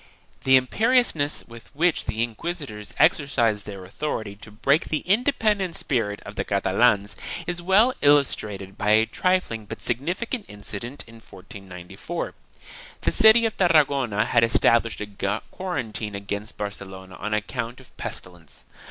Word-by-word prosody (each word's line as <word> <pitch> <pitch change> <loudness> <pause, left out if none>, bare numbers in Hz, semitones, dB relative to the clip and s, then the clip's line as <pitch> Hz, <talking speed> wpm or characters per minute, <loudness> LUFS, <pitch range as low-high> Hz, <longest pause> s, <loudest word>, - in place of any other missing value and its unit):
2 - - -21
The 130 0 +7
imperiousness 165 - +2
with 115 0 -13
which 170 +2 +2
the 110 +1 -1
inquisitors 120 - -6
exercised 115 -8 +2
their 100 -3 -8
authority 110 -1 -4
to 105 +2 -12
break 135 +8 +1
the 155 - -1
independent 210 -4 +1
spirit 110 -7 -1
of 105 - -9
the - - -1
Catalans 100 +1 +2 0.3
is 175 0 -3
well 200 +8 +4
illustrated 105 -9 +1
by 105 - 0
a 110 +1 +5
trifling 180 - 0
but - - -7
significant 185 - -2
incident 105 +6 -6
in 115 0 -14
1494. 95 - -8 0.7
The - - +1
city 225 +1 +6
of 225 - -1
Tarragona 140 - +3
had 115 -1 +3
established 115 0 +3
a 100 0 -3
quarantine 110 - -4
against 100 +1 -5
Barcelona 95 -2 -7
on 105 +1 -2
account 115 +3 -4
of 130 - -18
pestilence. 85 -6 -8
115 Hz, 135 wpm, -24 LUFS, 105-165 Hz, 0.7 s, The